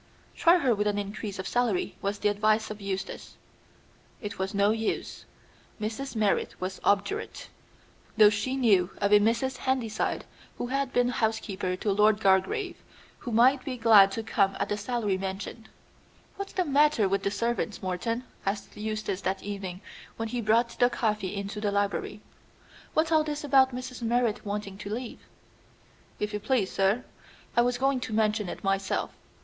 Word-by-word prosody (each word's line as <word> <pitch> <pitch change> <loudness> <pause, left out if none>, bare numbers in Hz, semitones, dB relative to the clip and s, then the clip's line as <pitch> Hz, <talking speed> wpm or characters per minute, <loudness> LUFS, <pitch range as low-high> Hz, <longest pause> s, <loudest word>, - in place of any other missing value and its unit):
"Try 340 +2 +5
her 265 -8 +2
with 210 0 0
an 205 0 0
increase 205 0 -4
of 190 - -4
salary," 240 -7 0
was 200 +1 -1
the 210 - +1
advice 215 +1 +1
of 210 -1 -8
Eustace. 195 -1 -5 0.8
It 205 -2 -6
was 190 +1 -2
no 200 +1 +4
use. 220 0 -3 0.5
Mrs. 225 +5 -4
Merrit 210 -2 0
was 185 +1 -4
obdurate, 205 - 0 0.7
though 210 -1 +8
she 215 +6 -1
knew 200 -9 +3
of 200 0 0
a 210 - +8
Mrs. 235 +5 +1
Handyside 250 -5 -1 0.3
who - - -3
had 270 +1 -1
been 245 -1 +2
housekeeper 220 -6 -1
to 205 +3 -1
Lord 210 +1 +4
Gargrave, 290 - +1 0.4
who 240 - -6
might 255 +4 +4
be 265 -3 -4
glad 215 -4 +7
to 225 - -3
come 200 -3 +1
at 200 - -1
the 205 - 0
salary 210 -2 -1
mentioned. 195 +4 -6 0.7
"What's 395 0 -6
the 365 - 0
matter 290 -6 +3
with 195 +1 0
the 200 - 0
servants, 225 +1 -2
Morton?" 210 +7 -2 0.2
asked 200 +1 -3
Eustace 215 -2 -3
that 190 0 -2
evening 195 -2 -5 0.4
when 225 0 -3
he 245 0 -2
brought 230 +2 +3
the 245 - +5
coffee 210 -5 -1
into 200 +1 -4
the 205 -1 0
library. 205 +1 -1 0.7
"What's 315 +1 +2
all 315 -1 +5
this 300 -1 -4
about 270 -2 +5
Mrs. 250 0 -6
Merrit 235 -1 +1
wanting 200 -1 -5
to 200 - -6
leave?" 235 +3 -5 1.0
"If 210 0 -2
you 210 - -1
please, 210 -3 0
sir, 195 +6 +1 0.5
I 240 - +5
was 245 0 +1
going 270 +1 +1
to 235 -3 -5
mention 215 -2 +1
it - - -7
myself. 195 0 0
215 Hz, 170 wpm, -28 LUFS, 200-245 Hz, 1.0 s, though